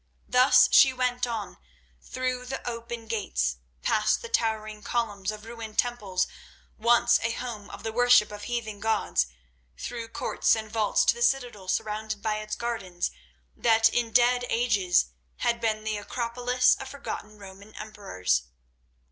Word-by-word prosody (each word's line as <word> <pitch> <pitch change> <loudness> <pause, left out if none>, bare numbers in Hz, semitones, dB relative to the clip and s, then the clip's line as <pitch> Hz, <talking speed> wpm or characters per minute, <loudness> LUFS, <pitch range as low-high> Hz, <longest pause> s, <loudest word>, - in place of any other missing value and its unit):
Thus 250 +2 +6
she 265 - +7
went 250 -1 0
on, 205 -6 -5 0.4
through 255 -1 -3
the 265 0 -5
open 235 -1 -5
gates, 65 - -1 0.3
past 215 - +2
the 470 - -6
towering 215 - -1
columns 210 -4 -2
of 215 0 -10
ruined 225 -2 -8
temples 205 -7 0 0.5
once 240 +2 +4
a 230 - 0
home 230 -5 -6
of - - -10
the 225 - -3
worship 245 -2 +5
of 205 0 -8
heathen 225 -4 -4
gods, 90 - +1 0.5
through 235 -2 -5
courts 225 - +1
and 220 -1 -6
vaults 220 -2 +2
to - - +5
the 475 - -9
citadel 245 - 0
surrounded 215 +2 -2
by 215 -1 0
its 215 0 -4
gardens 195 -7 -3 0.4
that 225 -1 +4
in 235 0 -1
dead 245 +1 +4
ages 195 - +2 0.3
had 235 0 0
been 215 -2 0
the 215 -1 -2
Acropolis 245 +3 +1
of 270 - -6
forgotten 235 -6 -7
Roman 200 +1 -13
emperors. 90 - -2
225 Hz, 150 wpm, -27 LUFS, 210-240 Hz, 0.5 s, she